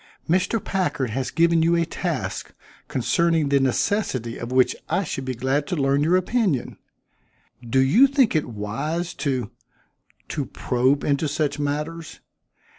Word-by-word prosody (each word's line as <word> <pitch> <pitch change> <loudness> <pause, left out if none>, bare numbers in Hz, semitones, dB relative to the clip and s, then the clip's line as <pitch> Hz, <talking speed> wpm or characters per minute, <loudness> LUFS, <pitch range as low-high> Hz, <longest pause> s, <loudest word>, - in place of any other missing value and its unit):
"Mr. 185 +6 +2
Packard 145 - -1
has 130 +1 -2
given 170 +1 +3
you 165 +1 +3
a 170 0 +2
task, - - -4 0.3
concerning 160 +3 +1
the 140 0 +4
necessity 130 - 0
of 120 +1 -6
which 130 0 +3
I 195 - +1
should 135 -5 -4
be 130 -1 -3
glad 135 +4 0
to - - -1
learn 140 -1 +2
your 175 +4 +4
opinion. 185 - -1 0.8
Do 120 +1 -2
you 140 - +6
think 270 - +2
it 155 - 0
wise 135 +11 -3
to 130 -6 -1 0.8
to 145 -3 -2
probe 130 +3 0
into 145 +2 +1
such 145 0 -1
matters? 150 +3 -4
145 Hz, 145 wpm, -23 LUFS, 130-170 Hz, 0.8 s, you